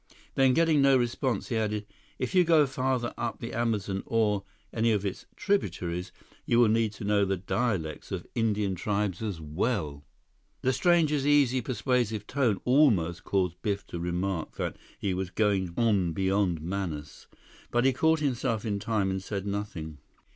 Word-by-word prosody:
Then, 130 -2 +4
getting 165 -3 +4
no 135 -1 +6
response, 120 -1 -1
he 115 - 0
added, 105 -1 -1 0.3
"If - - -3
you 180 -1 +6
go 160 -3 +5
farther 130 -2 -1
up 120 -1 -3
the 115 - -6
Amazon 105 -5 -1
or 105 -3 +1 0.3
any 115 0 +2
of 105 -1 -1
its 105 +5 -4
tributaries, 90 - -1 0.3
you 115 - +1
will 120 -3 +6
need 110 -1 +2
to 110 - -9
know 100 0 +2
the 95 0 0
dialects 95 -5 -2
of - - -4
Indian 105 -4 0
tribes 100 0 -1
as 105 -7 -3
well." 75 - -2 0.6
The 130 - +2
stranger's 150 0 +2
easy, 140 -3 +4
persuasive 115 -3 -1
tone 125 -7 +1
almost 110 - +3
caused 90 -2 -1
Biff 100 -1 -2
to 85 - -5
remark 90 0 -2
that - - -3 0.2
he 95 - -1
was 95 0 -3
going 95 -2 +1
on 100 -8 +2
beyond 95 -2 +1
Manaus. 85 -5 -5 0.4
But 120 +1 +1
he 135 - +4
caught 160 +4 +2
himself 125 -5 -1
in 100 -2 -1
time 100 -2 0
and 95 0 -2
said 100 0 -4
nothing. 95 -7 -4
105 Hz, 165 wpm, -28 LUFS, 95-125 Hz, 0.6 s, no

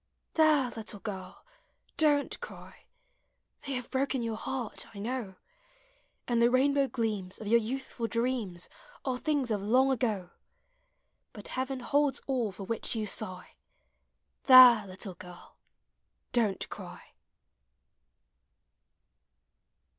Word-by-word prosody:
There! 305 -6 +4
little 220 -2 -6
girl, 190 -3 -7 0.5
don't 295 -3 +2
cry! - - -11 0.8
They 275 - -2
have 250 -2 -4
broken 265 -1 0
your 225 -1 -2
heart, 250 0 -5
I - - -9
know; 220 -2 -4 0.9
And 235 -1 +2
the 235 - +6
rainbow 275 +2 +3
gleams 210 -7 -3
Of 220 - -8
your 230 +3 +4
youthful 240 0 -4
dreams 230 -7 -1 0.4
Are 255 -2 -1
things 285 -6 0
of 205 -2 0
the 200 - -6
long 260 +4 +4
ago; 215 -8 -1 1.0
But - - -8
Heaven 260 0 -3
holds 285 +2 +2
all 250 -6 -1
for 195 - -9
which 225 +4 -2
you 220 -1 -1
sigh.— 185 -2 -4 0.9
There! 250 -5 +9
little 190 +1 -7
girl, 180 0 -14 0.7
don't 220 -6 0
cry! - - -10
235 Hz, 115 wpm, -30 LUFS, 205-265 Hz, 1.0 s, There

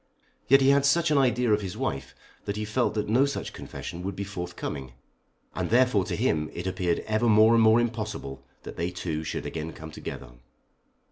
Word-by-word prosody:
Yet 135 +2 +6
he 135 - +5
had 140 0 +4
such 160 +3 +3
an 145 - +4
idea 125 -3 +2
of 105 - +2
his 95 -3 -6
wife, - - -3 0.3
that 100 - -3
he 105 0 -3
felt 115 +3 0
that 105 - -1
no 125 +6 +3
such 140 - -4
confession 85 - -7
would 95 +1 -4
be 100 - -3
forthcoming, 90 -9 -6 0.6
and - - -3
therefore 120 -5 +3
to - - -3
him 75 -1 0
it 85 - -5
appeared 90 -2 -1
ever 110 +2 +1
more 110 +1 +6
and 115 - +5
more 110 +1 +6
impossible 110 - -3 0.2
that - - -9
they 85 +1 -1
two 80 -3 -4
should - - -4
again 80 0 -5
come 80 0 -9
together. - - -8
105 Hz, 200 wpm, -27 LUFS, 90-120 Hz, 0.6 s, Yet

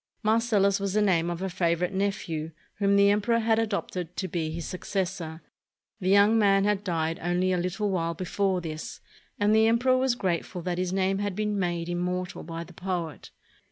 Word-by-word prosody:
Marcellus 215 -3 +3
was 200 -1 -2
the 215 - +3
name 175 -4 +2
of 175 +2 -4
a - - 0
favorite 175 0 0
nephew 190 -5 -2 0.3
whom 200 -1 +3
the 200 0 +6
emperor 215 +3 +2
had 225 -1 +2
adopted 190 -5 -3
to 190 - -2
be 165 -2 -2
his 165 0 -5
suc 185 - -6
cessor. 175 -4 -3 0.6
The 185 -2 -1
young 200 +3 +5
man 195 -2 +4
had 205 -1 +1
died 165 -3 -1
only 180 +2 +1
a 180 - +1
Uttle 195 +4 -1
while 170 -2 -1
be 185 - -5
fore 190 0 0
this, 155 -2 -6 0.4
and 205 +1 +3
the 220 0 +5
emperor 250 +3 +3
was 260 -2 +2
grateful 180 -3 -2
that 180 0 -2
his 180 -1 -1
name 190 +1 +1
had 205 -2 -2
been 210 -1 -1
made 175 -2 -1
immortal 180 +2 -2
by 165 +1 -6
the 175 +1 -14
poet. 175 -3 -4
185 Hz, 195 wpm, -27 LUFS, 175-205 Hz, 0.6 s, the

